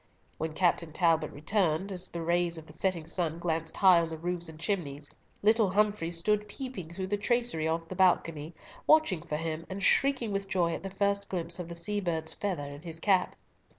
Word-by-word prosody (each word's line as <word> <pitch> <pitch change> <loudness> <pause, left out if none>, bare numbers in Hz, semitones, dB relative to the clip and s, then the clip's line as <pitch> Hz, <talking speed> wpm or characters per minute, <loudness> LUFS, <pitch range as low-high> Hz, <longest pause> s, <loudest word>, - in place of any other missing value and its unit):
When 160 0 -2
Captain 170 -1 +1
Talbot 160 -2 +2
returned, 180 +3 0
as 185 -1 -2
the 170 -1 -5
rays 170 0 +1
of 160 - -9
the 150 - -13
setting 170 -1 -1
sun 165 -1 -1
glanced 165 -1 -2
high 185 -3 +7
on 165 - -2
the 160 - -5
roofs 175 0 -3
and 155 -1 -11
chimneys, 150 -7 -3 0.3
little 220 -1 +4
Humfrey 205 -3 +1
stood 210 +5 0
peeping 210 - -6
through 190 +2 -4
the 205 +2 -1
tracery 235 -7 0
of 165 +1 -1
the 185 - -6
balcony, 165 -4 +2 0.3
watching 310 - +4
for 150 -2 -3
him, 160 0 -3
and 195 +1 -5
shrieking 265 -5 +3
with 195 -1 -2
joy 175 -4 +1
at - - -4
the 195 - -5
first 200 +1 0
glimpse 170 -1 -2
of 175 - -4
the 170 - -6
sea 205 +5 -2
bird's 160 -3 -2
feather 180 -8 -3
in 145 +1 -9
his 165 -1 -8
cap. 190 0 +2
175 Hz, 205 wpm, -30 LUFS, 160-200 Hz, 0.3 s, high